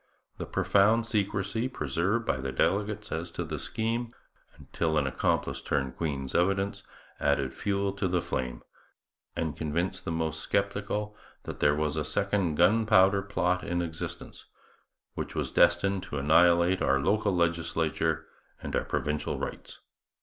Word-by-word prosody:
The - - -4
profound 110 +4 +3
secrecy 105 0 -1
preserved 90 - -1
by 65 - 0
the 65 0 -4
delegates 105 +6 0
as 85 +2 -3
to 90 - -3
the 80 -2 -5
scheme, 115 - -2 0.5
until 80 -2 -2
an 75 - +2
accomplice 70 - 0
turned 65 -2 -1
Queen's 70 -5 -3
evidence, 100 +3 +1 0.4
added 70 -2 +1
fuel 100 -1 -1
to 100 -1 -1
the 90 0 +1
flame, 65 -6 -3 0.7
and 80 -2 -2
convinced 80 +4 -2
the - - -3
most 80 -1 -2
sceptical 100 +1 -1 0.3
that - - -7
there 75 - +4
was 75 0 -1
a 75 - 0
second 95 +1 0
Gunpowder 100 +1 +4
Plot 90 -2 0
in 85 0 -1
existence, 80 -2 -6 0.7
which - - -5
was - - -2
destined 90 +3 +3
to 75 - -6
annihilate 85 +5 +4
our 70 0 +3
local 100 +6 +1
legislature 80 -2 0 0.3
and - - -4
our - - 0
provincial 75 0 -2
rights. - - -6
85 Hz, 140 wpm, -28 LUFS, 80-100 Hz, 0.7 s, there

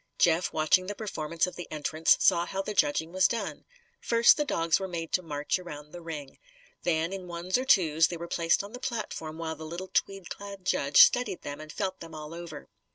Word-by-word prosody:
Jeff, 170 +1 +3
watching 160 +4 +2
the 205 - -4
performance 170 -6 -2
of 180 - -7
the 175 - -7
entrants, 155 +1 +2
saw 175 -2 +3
how 190 - -4
the 205 +2 -2
judging 160 -3 +1
was 185 +1 +4
done. 235 - -4 0.3
First 235 0 +5
the 300 - 0
dogs 165 - +1
were 190 - -3
made 170 -2 -5
to 185 - +2
march 150 0 -2
around 150 -4 -9
the 175 - -9
ring. 150 -4 -8 0.4
Then, 165 +1 0
in 190 -2 -6
ones 175 +2 -3
or 255 - +1
twos, 165 - +4
they 175 - -5
were 170 +1 -6
placed 170 +2 +1
on 205 +3 -10
the 250 - -7
platform 185 -11 -4
while 160 -1 -4
the 160 - -10
little 170 +4 -6
tweed 195 -2 -1
clad 200 -2 -8
judge 140 -6 +6
studied 245 -7 +2
them 145 +1 -6
and 155 0 -9
felt 190 0 -3
them 165 -1 -10
all 155 +1 -8
over. 170 -3 -8
170 Hz, 220 wpm, -28 LUFS, 160-190 Hz, 0.4 s, judge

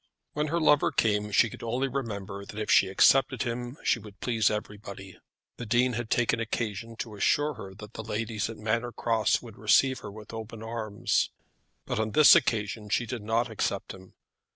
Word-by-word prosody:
When 150 +1 -1
her 170 +3 0
lover 150 -2 +4
came, 105 -1 +1
she 110 - +5
could - - -10
only 125 +4 -1
remember 100 -7 -5
that 100 - -11
if 110 - -1
she 95 - +6
accepted 130 +7 +4
him 120 +2 -4
she - - +2
would 105 -2 -13
please 115 -4 +1
everybody. 100 -2 -7 0.4
The 120 - -6
Dean 125 +3 +2
had 115 -1 -4
taken 120 -1 +1
occasion 115 0 -3
to 110 -1 -6
assure 145 +8 +1
her 95 -6 -10
that 105 0 -11
the - - -6
ladies 110 0 -3
at 115 - -8
Manor 115 +3 -1
Cross 115 -3 +1
would 115 -3 -12
receive 130 +5 +3
her 105 - -8
with 105 +1 -11
open 110 0 -7
arms. 110 -2 -1 0.6
But - - -2
on 110 -1 -1
this 155 -1 +8
occasion 105 -1 0
she 120 - +1
did 115 0 -5
not 115 +2 0
accept 100 -2 -2
him. 95 -1 -15
110 Hz, 190 wpm, -28 LUFS, 105-120 Hz, 0.6 s, this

